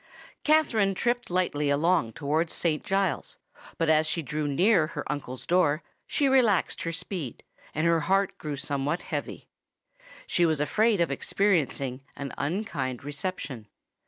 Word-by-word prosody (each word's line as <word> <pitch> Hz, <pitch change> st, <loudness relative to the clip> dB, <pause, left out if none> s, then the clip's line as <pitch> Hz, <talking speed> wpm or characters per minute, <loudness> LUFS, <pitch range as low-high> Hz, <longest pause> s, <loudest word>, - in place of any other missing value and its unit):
Katherine 230 Hz, -11 st, +3 dB
tripped 240 Hz, +4 st, 0 dB
lightly 175 Hz, -5 st, 0 dB
along 150 Hz, -4 st, +2 dB
towards 155 Hz, +5 st, -1 dB
Saint 155 Hz, -3 st, 0 dB
Giles's; 195 Hz, -6 st, -1 dB, 0.4 s
but 165 Hz, -, +1 dB
as 155 Hz, 0 st, +4 dB
she 165 Hz, +1 st, -1 dB
drew 150 Hz, +2 st, -2 dB
near 175 Hz, +3 st, +3 dB
her 150 Hz, -2 st, -5 dB
uncle's 130 Hz, -3 st, -5 dB
door, 165 Hz, -4 st, +2 dB, 0.2 s
she 285 Hz, -, +1 dB
relaxed 245 Hz, -8 st, +3 dB
her 165 Hz, -, -2 dB
speed, 165 Hz, -, -5 dB, 0.3 s
and 155 Hz, +2 st, +1 dB
her 170 Hz, -1 st, +4 dB
heart 195 Hz, +5 st, +1 dB
grew 150 Hz, -2 st, -4 dB
somewhat 145 Hz, +3 st, -2 dB
heavy. -, -, -5 dB, 0.8 s
She 175 Hz, -, +1 dB
was 155 Hz, -2 st, +1 dB
afraid 210 Hz, +7 st, +2 dB
of 170 Hz, -, +1 dB
experiencing 140 Hz, -6 st, 0 dB
an 140 Hz, -1 st, -6 dB
unkind 140 Hz, -, -2 dB
reception. 145 Hz, -, -5 dB
160 Hz, 140 wpm, -27 LUFS, 145-195 Hz, 0.8 s, as